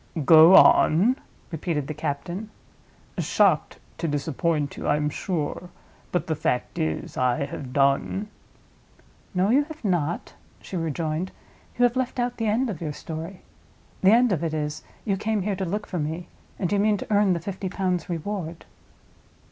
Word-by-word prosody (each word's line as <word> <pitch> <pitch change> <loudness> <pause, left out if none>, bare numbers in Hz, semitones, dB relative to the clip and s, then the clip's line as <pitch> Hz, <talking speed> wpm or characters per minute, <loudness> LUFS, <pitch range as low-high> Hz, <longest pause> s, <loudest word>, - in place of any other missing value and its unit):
"Go 160 +4 +9
on?" 195 +12 +6 0.4
repeated 160 -3 -2
the 155 - -4
captain. 155 +7 -4 0.7
"Shocked - - +2 0.2
to 165 - -1
disappoint 145 0 -1
you, - - -5
I 145 - +3
am 150 0 -1
sure; 175 +1 -3 0.4
but 175 -4 0
the 160 - -1
fact 125 -4 -2
is, 80 0 -2
I 125 +2 +1
have 135 -2 -7
done." 140 +9 +1 1.1
"No, 185 +4 +2
you 280 +4 +5
have 315 -5 -10
not," 175 -4 -1 0.3
she - - -8
rejoined; 165 +1 -2 0.5
"you 245 - +3
have 245 0 +4
left 255 -1 -1
out 245 0 -1
the 225 - -1
end 230 +5 +1
of 195 -8 -5
your 155 -3 -3
story. 165 +5 -7 0.6
The 190 - +6
end 240 +2 +5
of 170 -3 0
it 160 -1 -1
is, 150 0 -3 0.2
you 200 -3 0
came 215 0 -1
here 205 0 -1
to 190 0 -3
look 205 +4 -3
for 180 - -4
me; 160 +3 -3 0.3
and 185 -2 -2
you 205 - +2
mean 210 0 +3
to 210 - -4
earn 205 -2 +4
the 170 - -1
fifty 190 +2 -5
pounds 180 -3 -1
reward." 170 -1 -4
175 Hz, 170 wpm, -25 LUFS, 155-205 Hz, 1.1 s, Go